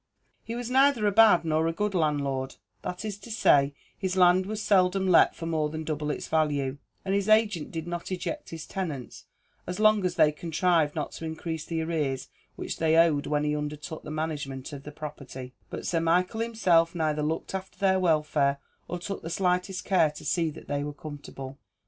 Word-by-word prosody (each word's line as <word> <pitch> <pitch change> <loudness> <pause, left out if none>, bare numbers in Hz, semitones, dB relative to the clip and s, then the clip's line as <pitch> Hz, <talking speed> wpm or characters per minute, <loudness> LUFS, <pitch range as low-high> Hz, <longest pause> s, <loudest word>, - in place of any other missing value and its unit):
He 230 - -5
was 245 0 -4
neither 265 -4 +4
a 205 - +4
bad 210 -5 +6
nor 160 0 +1
a - - +1
good 210 +4 -2
landlord 140 -5 0 0.3
that 180 +4 -5
is 205 -2 -4
to 205 - -12
say, 145 -10 +3 0.2
his 190 -1 -2
land 185 +1 +5
was 215 0 -3
seldom 190 -2 +3
let 180 - +5
for 165 - -6
more 155 -2 0
than 155 +1 -5
double 150 -1 -3
its 150 - -3
value; 145 -4 0 0.3
and 195 - 0
his 200 +1 0
agent 215 -7 +3
did 165 -1 -4
not 175 +1 -5
eject 295 - -4
his 165 -2 -7
tenants 155 -10 -5 0.4
as 180 +3 -4
long 215 -2 +5
as 180 -1 0
they 150 - +5
contrived 165 0 +1
not 150 - -3
to 165 - -7
increase 160 0 -4
the 165 -1 -2
arrears 150 -5 -2 0.3
which - - -5
they 160 0 +3
owed 160 -4 +4
when 150 0 +1
he 150 0 0
undertook 150 +1 -5
the - - -9
management 150 -3 -4
of 140 - -7
the 150 - -9
property; 135 -4 -8 0.2
but - - -6
Sir 165 - +1
Michael 180 +6 +1
himself 180 -8 +2
neither 155 -2 0
looked 155 +5 -2
after 190 0 -5
their 190 -1 +3
welfare, 150 -5 +2 0.3
or 175 - -3
took 195 +3 -5
the 165 - -6
slightest 180 +2 0
care 180 -5 +4
to 150 - -11
see 170 -2 +1
that 150 - -11
they 145 0 -1
were 145 0 -4
comfortable. 145 -2 -9
165 Hz, 200 wpm, -27 LUFS, 150-185 Hz, 0.4 s, bad